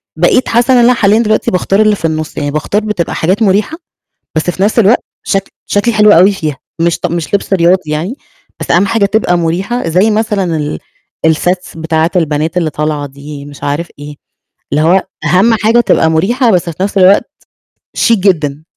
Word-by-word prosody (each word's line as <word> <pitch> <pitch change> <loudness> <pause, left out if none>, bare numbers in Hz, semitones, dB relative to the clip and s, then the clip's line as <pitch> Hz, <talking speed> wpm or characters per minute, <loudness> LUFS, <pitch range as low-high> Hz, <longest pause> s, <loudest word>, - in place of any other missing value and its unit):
بقيت 175 +9 +2
حاسة 240 +3 +2
إن - - +5
أنا 250 - +5
حاليًا 215 -1 +2
دلوقتي 215 -1 0
باختار 195 +3 +1
اللي 215 -1 +3
في 165 - -6
النُص، 155 -1 -3
يعني 145 -1 -2
باختار 155 +8 -1
بتبقى 210 -6 -3
حاجات 190 +7 0
مُريحة 210 - +1 0.6
بس 160 +3 0
في 190 +2 -2
نَفس 220 +3 +1
الوقت 220 +3 +3 0.2
شك 195 -1 -2
شكلي 210 +3 0
حلو 210 0 +5
أوي 185 +3 +6
فيها. 155 -8 -4 0.2
مش 170 0 0
ط 180 - -2
مش 170 +2 -4
لِبس 200 0 0
رياضي 175 -2 +2
يعني، 170 - -3 0.4
بس - - -3
أهم 180 +4 +3
حاجة 220 -1 +1
تبقى 200 -4 +1
مُريحة 175 +6 -2
زَي 185 +7 +2
مثلًا 210 -6 -1
ال 150 0 -4 0.6
الsets 180 0 -3
بتاعِة 160 +1 0
البنات 160 0 -1
اللي 165 -3 0
طالعة 150 -1 -3
دي 140 +1 -10
مش 145 -1 -12
عارف 150 +4 -2
إيه. 145 0 -9 0.6
اللي 150 +2 +1
هو 185 +4 +3 0.2
أهم 200 +6 +3
حاجة 225 +2 +3
تبقى 160 -8 +2
مريحة 230 - +1
بس 180 -2 0
في 175 +4 -4
نَفس 200 0 -2
الوقت 190 +2 +5 0.7
شيك 230 -1 +2
جدًا. 155 -6 0
180 Hz, 190 wpm, -12 LUFS, 160-210 Hz, 0.7 s, أوي